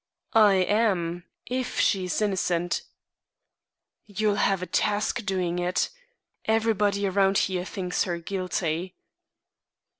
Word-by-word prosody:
"I 210 -3 +6
am 185 -3 +1 0.2
if 255 0 -3
she 190 -3 +2
is 180 +4 -1
innocent." 180 -4 0 1.3
"You'll 210 0 0
have 195 -2 +1
a - - -2
task 210 +6 0
doing 180 -3 -1
it. 180 +1 0 0.5
Everybody 210 -2 +1
around 195 0 +2
here 185 -2 0
thinks 185 -2 -2
her 175 -2 -2
guilty." 180 -1 -3
190 Hz, 110 wpm, -26 LUFS, 180-210 Hz, 1.3 s, I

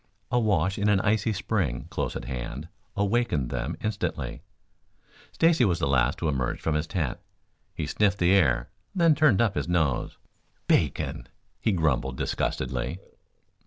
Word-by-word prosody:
A 125 - +3
wash 95 -3 +1
in 105 +1 +2
an 100 -2 +4
icy 110 +1 +1
spring 90 - -1
close - - -2
at - - -5
hand 65 +4 -5 0.3
awakened 100 - 0
them 75 +6 -3
instantly. 105 -2 -3 0.9
Stacy 165 -5 +3
was 90 -7 +2
the 80 - 0
last 70 +3 +2
to 85 - -2
emerge 65 -5 -1
from 80 - -1
his 75 +1 -1
tent. 80 -10 -2 0.6
He - - -2
sniffed 100 -1 +1
the 90 0 +3
air, 65 -11 +3 0.2
then 170 -3 +5
turned 140 -8 +4
up 110 - +1
his - - -2
nose. 80 -7 0 0.5
"Bacon!" - - +1 0.3
he 110 - +1
grumbled 65 -7 0
disgustedly. 65 +4 -2
90 Hz, 150 wpm, -27 LUFS, 70-105 Hz, 0.9 s, then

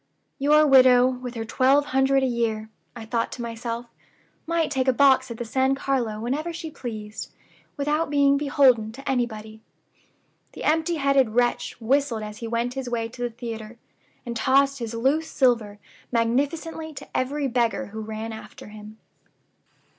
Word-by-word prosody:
'Your 300 +2 +5
widow, 255 -3 +7
with 250 -1 -5
her 225 -1 -4
twelve 270 +5 +3
hundred 270 0 +3
a - - +3
year,' 225 -3 -1 0.2
I 230 -2 -8
thought 230 +1 -1
to 245 - -7
myself, 235 0 -5 0.6
'might 330 -2 0
take 265 -2 0
a 260 - +4
box 265 -1 +4
at 235 - -6
the 240 - -4
San 265 +4 +1
Carlo 250 -6 -1
whenever 280 +9 -2
she 325 -1 -7
pleased, 215 -6 -7 0.5
without 295 +2 0
being 280 -1 +4
beholden 265 -6 +3
to 275 +3 -11
anybody.' 220 -4 -3 0.9
The - - -8
empty 320 +2 +1
headed 275 -6 +2
wretch 240 -1 0
whistled 245 -1 0
as 210 0 -8
he 230 - -5
went 235 +2 -1
his 265 -2 -5
way 230 -1 -2
to 245 +1 -11
the 245 - 0
theater, 230 -1 -7 0.5
and 235 -1 -5
tossed 275 +4 +2
his 230 -1 -5
loose 285 +7 +1
silver 230 -6 +1 0.3
magnificently 290 +7 -1
to - - -9
every 280 +2 -1
beggar 245 +2 0
who 220 - -5
ran 220 +1 -5
after 220 -1 -11
him." 215 +1 -11
250 Hz, 160 wpm, -24 LUFS, 230-275 Hz, 0.9 s, widow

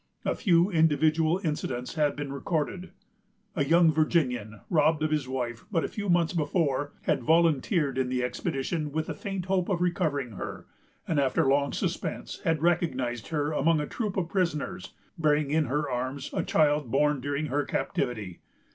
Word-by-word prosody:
A - - +2
few 180 -2 +3
individual 160 +1 +3
incidents 130 -6 -3
have 150 -3 +1
been 145 -1 -5
recorded. 165 +5 -2 0.7
A 150 - +2
young 165 +3 +5
Virginian, 125 - 0
robbed 155 -1 +2
of 155 - 0
his 150 -4 0
wife 120 -3 -3
but 165 -5 +1
a - - 0
few 205 -2 -5
months 175 -1 +3
before, 145 -3 0
had - - +1
volunteered 160 - +2
in 130 -1 0
the 125 -1 0
expedition 145 +5 -2
with 155 +2 -1
the - - -4
faint 195 -4 -5
hope 185 -2 0
of 185 -3 +1
recovering 160 -8 0
her; 100 - -7 0.4
and, 155 - +1
after 135 -1 +2
long 140 +1 +2
suspense, - - -3
had 160 -1 0
recognized 130 -9 0
her 150 -2 -1
among 155 +2 +2
a 150 - -1
troop 210 +3 -3
of 180 -3 0
prisoners, 175 -1 -2 0.2
bearing 150 -2 +2
in 155 0 +2
her 145 +3 -1
arms 130 +2 -3
a - - 0
child 150 -4 +2
born 145 +1 +2
during 145 +3 -2
her 145 +1 0
captivity. 105 -12 -3
150 Hz, 170 wpm, -28 LUFS, 135-165 Hz, 0.7 s, young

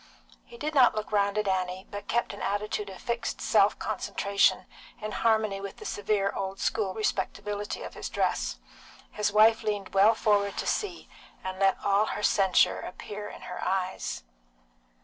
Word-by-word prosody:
He 470 - -13
did 305 -4 -3
not 255 -6 +6
look 215 0 -4
round 200 0 +2
at 210 -1 0
Annie, 185 0 -1
but 205 0 -7
kept 240 - 0
an - - -9
attitude 205 0 -2
of 190 - -10
fixed 235 0 -3
self - - +3
concentration, 200 0 +1 0.3
in 215 0 -5
harmony 215 -3 +1
with 200 -1 -7
the - - -10
severe 205 -1 0
old 195 0 -4
school 200 -4 0
respectability 205 -1 -2
of - - -7
his - - -6
dress; - - -1 0.5
his 210 -1 0
wife 220 +2 +5
leaned 205 -3 -3
well 205 +3 +6
forward 205 -2 +1
to - - -2
see, 385 -5 -2 0.4
and 185 0 -5
let 195 -1 +4
all 200 +1 +4
her 210 - -4
censure 195 -4 +4
appear 205 +3 -7
in - - -11
her 180 - -6
eyes. 185 - -2
205 Hz, 170 wpm, -28 LUFS, 195-215 Hz, 0.5 s, not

